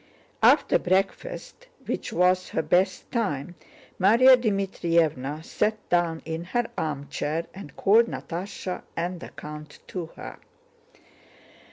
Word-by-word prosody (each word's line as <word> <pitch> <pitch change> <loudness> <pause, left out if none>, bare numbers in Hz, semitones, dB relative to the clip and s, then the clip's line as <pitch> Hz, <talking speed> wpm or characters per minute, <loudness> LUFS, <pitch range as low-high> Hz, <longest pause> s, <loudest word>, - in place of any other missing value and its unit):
After - - +5
breakfast, 195 - -2 0.2
which - - -3
was 180 0 +2
her 160 - -1
best 180 +4 +1
time, 175 - -1 0.5
Márya 235 +7 +7
Dmítrievna 170 - 0
sat 215 +1 0
down 170 -2 +1
in 160 +1 -4
her 240 +7 -1
armchair 150 +1 -2
and 190 -8 -10
called 225 +4 +5
Natásha 185 0 -5 0.2
and 175 +1 -2
the - - -9
count 150 0 -9
to 175 -3 -4
her. - - -9
180 Hz, 115 wpm, -26 LUFS, 160-200 Hz, 0.5 s, Márya